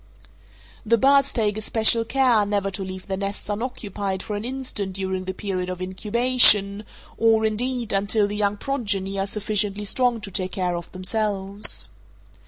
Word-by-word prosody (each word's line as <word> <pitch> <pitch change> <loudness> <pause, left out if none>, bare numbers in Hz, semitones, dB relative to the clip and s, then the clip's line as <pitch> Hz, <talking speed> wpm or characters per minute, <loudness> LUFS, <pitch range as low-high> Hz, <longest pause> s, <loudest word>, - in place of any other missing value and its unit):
The 230 +1 +3
birds 275 +3 +4
take 215 -3 0
especial 220 +1 +3
care 245 -3 +3
never 200 -1 -1
to 195 +1 -5
leave 185 0 -7
their 190 -2 -3
nests 200 +1 -5
unoccupied 205 -4 -4
for 210 - -4
an 205 - -4
instant 245 -6 -4
during 190 -1 -3
the 190 - -3
period 185 -3 -3
of 180 -1 -5
incubation, 210 +1 +3 0.3
or, 225 -1 +3
indeed, 235 +1 -1
until 205 +2 +2
the 205 +1 -4
young 205 0 0
progeny 205 -7 -2
are 195 - -1
sufficiently 205 0 0
strong 245 +2 +1
to 200 - -7
take 185 0 -2
care 180 -2 -1
of 170 0 -7
themselves. 200 - 0
205 Hz, 160 wpm, -23 LUFS, 195-225 Hz, 0.3 s, birds